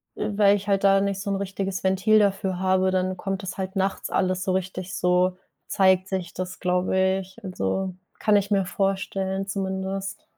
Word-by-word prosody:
äh, - - -2
weil 200 -1 +6
ich 200 0 -5
halt 195 -1 +1
da 195 0 +5
nicht 200 -1 -1
so 200 - -3
'n - - +1
richtiges 195 -1 -3
Ventil 190 +3 +4
dafür 195 -2 +1
habe, 190 0 +2
dann 185 0 0
kommt 195 +1 -3
das 185 - -5
halt 190 +1 -4
nachts 195 0 -1
alles 185 -1 0
so 190 - 0
richtig 185 0 -3
so 180 +1 +2 0.3
zeigt 190 -1 +3
sich 190 -2 -4
das, 185 0 -5
glaube 180 +1 0 0.2
ich. 190 +4 -14
Also, 185 - -2 0.2
kann 210 -1 +3
ich 200 0 +1
mir 195 -1 +3
vorstellen, 195 0 -1
zumindest. 195 0 -3
190 Hz, 185 wpm, -25 LUFS, 185-195 Hz, 0.3 s, weil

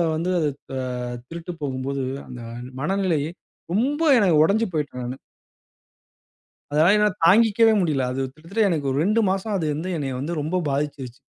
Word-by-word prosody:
வந்து 170 +3 -1
அது 150 -3 +1 0.3
ஆ - - -2 0.5
திருட்டு 170 +3 -7
போகும்போது, 135 0 -2 0.2
அந்த 125 -1 -8 0.4
மனநிலை, 185 -2 +1 0.5
ரொம்ப 275 +9 +1 0.2
என 205 -5 +4
உடைஞ்சு 220 +7 +2
போயிட்டேன் 145 -4 -3
நானு. 125 +2 -5 1.5
அதனால 155 +5 +4
என்னால 210 -2 +2
தாங்கிக்கவே 225 +4 +5
முடியல. 150 -7 +1
அது 135 - -3
கிட்டத்தட்ட 175 +8 -2
எனக்கு 150 -4 -1
ஒரு 135 - 0
2 215 +7 +2
மாசம் 195 +3 -1
அது 165 - -1
வந்து 160 +5 -4
என்னைய 135 -3 -3
வந்து 160 +5 -3
ரொம்ப 155 +5 -2
பாதிச்சிருச்சு. 140 -2 -3
165 Hz, 150 wpm, -23 LUFS, 140-195 Hz, 1.5 s, தாங்கிக்கவே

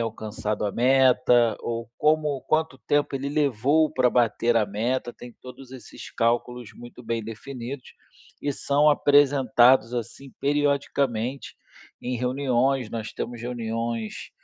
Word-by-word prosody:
alcançado 110 -2 -4
a 100 - -3
meta 125 -1 +3
ou 115 -1 -4
como 150 -2 +1
quanto 155 -3 0
tempo 145 +2 -1
ele 135 +1 -3
levou 145 +1 +2
pra 125 -1 +2
bater 115 0 +1
a 110 - +2
meta. 120 +5 -2
Tem 120 0 -12
todos 130 0 -12
esses 130 -1 -11
cálculos 120 0 -1
muito 120 0 -13
bem 115 0 -2
definidos 125 +4 -8 0.5
e 145 - -1
são 145 +2 +2
apresentados, 135 -4 +4
assim, 120 +3 -6
periodicamente 140 -3 -1 0.5
em 125 0 -3
reuniões. 130 -1 0
Nós 115 -1 -5
temos 120 -1 -6
reuniões, 115 -2 -4
125 Hz, 125 wpm, -24 LUFS, 115-140 Hz, 0.5 s, apresentados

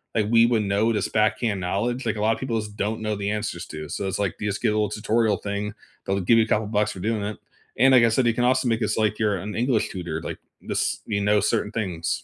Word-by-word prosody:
like 110 - +2
we 115 0 +6
would 115 -3 +2
know 100 +3 +1
it 115 - -1
as - - 0
"backhand 110 -1 +1
knowledge," 120 +8 -1
like, 110 -1 -1
a - - -3
lotta 110 +1 +2
people 115 -4 -1
just 105 -1 -7
don't 110 +2 -1
know 110 -1 -1
the 100 +1 -2
answers 105 -5 -3
to, 75 -1 -7
so 100 - -3
it's 95 - -3
like, 100 -4 -1
you 105 - -1
just 100 - -3
get - - +2
a - - +2
little 105 -2 +1
tutorial 105 -1 +1
thing. 105 +1 -4 0.3
They'll 95 0 0
give 115 +6 +4
you 110 - +5
a - - -12
couple 105 -1 +1
bucks 105 0 +1
for 95 - -9
doing 110 0 -1
it. 105 0 -4 0.4
And 135 +3 +5
like 120 -2 +7
I 115 - +5
said, 120 +2 +2
you 115 - +2
can 120 - 0
also 130 0 +2
make 115 0 +1
this 110 - 0
like 105 -1 +1
you're 105 -3 +1
an 105 +2 -6
English 120 0 +1
tutor, 85 -4 -5
like, - - -5 0.3
this - - -1
you 100 - 0
know 105 +1 +3
certain 105 +1 0
things. 90 -7 -3
105 Hz, 280 wpm, -24 LUFS, 100-115 Hz, 0.4 s, like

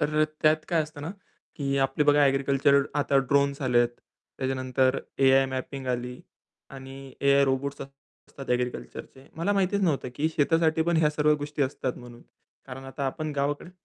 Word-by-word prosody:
तर 150 0 +1
अ, - - +5 0.2
त्यात 155 0 +3
काय 165 -2 +2
असतं 150 -1 -10
ना 160 - -4 0.5
की 140 -1 -1
आपली 135 +2 -1
बघा 145 0 +5
ॲग्रीकल्चर 140 +1 +3
आता 140 -1 +2
ड्रोन्स 140 0 +2
आले 125 -2 +2
आहेत. 120 - +4 0.5
त्याच्यानंतर 130 0 0 0.2
एआय 135 0 +5
मॅपिंग 130 +1 -5
आली 125 0 -3 0.5
आणि 135 0 -10
एआय 140 0 +4
रोबोट्ससं 135 +1 -2 0.4
असतात 135 -2 -9
ॲग्रीकल्चरचे. 125 - -4
मला 170 +5 0
माहितीच 200 0 +1
नव्हतं 150 -8 0
की 155 +4 0
शेतासाठी 160 +1 +2
पण 170 +1 +1
ह्या 150 -2 +3
सर्व 150 0 +2
गोष्टी 145 0 -3
असतात 130 -1 -2
म्हणून. 120 -1 -13 0.4
कारण 135 0 -9
आता 135 +1 -4
आपण 155 +3 -4
गावाकडे 145 +4 -2
140 Hz, 165 wpm, -26 LUFS, 130-150 Hz, 0.5 s, अ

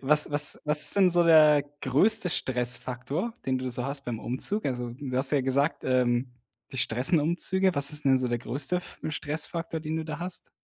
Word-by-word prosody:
Was 150 +2 +2
was 145 0 +2
was 150 0 +4
ist - - +3
denn 190 -2 +4
so 175 0 +3
der 155 -3 +5 0.2
größte 180 - +2
Stressfaktor, 125 - -3
den 130 -1 -1
du 130 0 -5
so 125 0 -2
hast 140 0 -5
beim 115 -2 -5
Umzug? 165 - -4
Also, 125 -2 -4
du 130 +1 -6
hast 135 +1 +3
ja 145 -2 +1
gesagt, 140 +4 -1
ähm, 125 -1 0 0.4
dich 130 - -1
stressen 130 +8 +2
Umzüge, 185 +3 0
was 140 +1 +6
ist 150 0 0
denn 135 -1 +3
so 130 - -2
der 120 0 -2
größte 135 +7 -1
F 180 - -9
Stressfaktor, 160 +2 -4
den 155 0 -4
du 160 - -4
da 155 0 -7
hast? 180 +1 -6
145 Hz, 205 wpm, -26 LUFS, 130-160 Hz, 0.4 s, was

